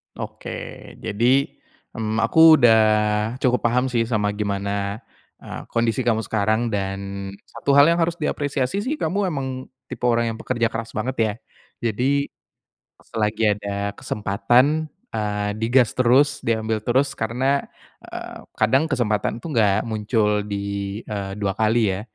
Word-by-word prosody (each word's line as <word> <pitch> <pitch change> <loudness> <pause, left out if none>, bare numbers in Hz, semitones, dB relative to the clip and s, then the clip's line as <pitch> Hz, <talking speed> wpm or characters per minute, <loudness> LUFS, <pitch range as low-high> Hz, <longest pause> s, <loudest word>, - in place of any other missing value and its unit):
Oke. - - -8
Jadi, 125 +6 +2 0.5
m 110 -1 -2
aku 160 +8 +7
udah 115 -6 +6 0.6
cukup 125 -1 +2
paham 125 +2 +1
sih 115 -2 +1
sama 105 -3 0
gimana 100 0 -3 0.4
e - - -15 0.2
kondisi 115 +2 0
kamu 115 -2 +1
sekarang. 110 +3 0
Dan 100 -1 -4
satu 140 +4 -1
hal 140 0 +8
yang 170 - +1
harus 165 0 +1
diapresiasi 145 0 -1
sih 260 +9 -2
kamu 200 -8 -1
emang 130 -5 -4 0.2
tipe 125 -1 -4
orang 115 -1 +2
yang 110 - -7
pekerja 120 -2 0
keras 115 0 -5
banget 125 +4 -2
ya. 110 -2 +2 0.6
Jadi, 140 +6 0 0.7
selagi 110 0 -2
ada 100 0 -3
kesempatan, 120 +10 +1 0.2
eee, 105 -2 -2
di 110 - -1
gas 125 -4 +4
terus, 135 +3 +3
diambil 110 -1 0
terus. 135 +3 +2
Karena, 130 +5 0 0.4
eee, - - -8 0.2
kadang 130 +7 +3
kesempatan 115 -5 0
itu - - -9
enggak 105 -4 +3
muncul 105 -1 0
di, 100 0 -4
eee, 100 -2 -4
2 100 -2 0
kali 110 -1 +2
ya. - - -5
115 Hz, 140 wpm, -22 LUFS, 105-130 Hz, 0.7 s, hal